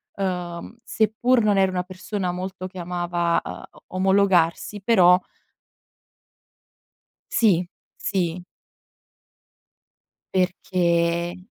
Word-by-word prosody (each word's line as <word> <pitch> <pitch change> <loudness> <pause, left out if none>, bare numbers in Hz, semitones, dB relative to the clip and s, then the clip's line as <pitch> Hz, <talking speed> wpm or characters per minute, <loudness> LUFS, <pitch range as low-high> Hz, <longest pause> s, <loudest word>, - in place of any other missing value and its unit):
uhm, 180 0 -4
seppur 230 +2 +1
non 205 -2 +3
ero 190 - +4
una 180 -1 -1
persona 185 0 -4
molto 185 +1 -6
che 185 0 -8
amava, 175 -1 0
uhm, - - -7 0.3
omologarsi, 190 0 +2
però 180 -4 +5 2.1
Sì, 185 -6 +3 0.3
sì. 180 -3 -2 1.9
Perchè 175 -1 0
185 Hz, 80 wpm, -23 LUFS, 175-195 Hz, 2.1 s, però